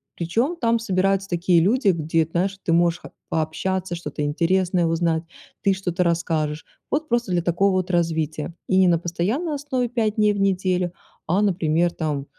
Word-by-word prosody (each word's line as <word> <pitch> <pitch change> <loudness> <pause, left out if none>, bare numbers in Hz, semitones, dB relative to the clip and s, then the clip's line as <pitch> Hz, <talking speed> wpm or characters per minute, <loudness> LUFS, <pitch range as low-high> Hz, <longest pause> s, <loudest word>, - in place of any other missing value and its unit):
причём, 230 - -1
там 230 -6 +1
собираются 195 -2 0
такие 175 0 +3
люди, 210 +5 +3
где, 165 -2 +1
знаешь, 190 +3 0
ты 165 - +1
можешь, 170 0 +3
как, - - -12 0.2
пообщаться, 175 +3 -2
что-то 165 -3 -5
интересное 175 +4 +1
узнать, 165 0 0 0.4
ты 195 - +3
что-то 180 -2 -1
расскажешь. 160 -3 -1 0.3
Вот 305 +2 0
просто 240 -5 0
для 175 - +1
такого 180 +4 +2
вот 185 0 -1
развития. 160 -2 -1
И 185 0 +4
на 170 -1 +4
постоянной 205 - -2
основе 265 -4 -2
5 220 -4 0
дней 210 -1 +3
в 200 - -4
неделю, 185 -2 +1 0.4
а, 180 +5 +2
например, 175 -3 +1
там 150 -5 -3
180 Hz, 165 wpm, -23 LUFS, 165-195 Hz, 0.4 s, И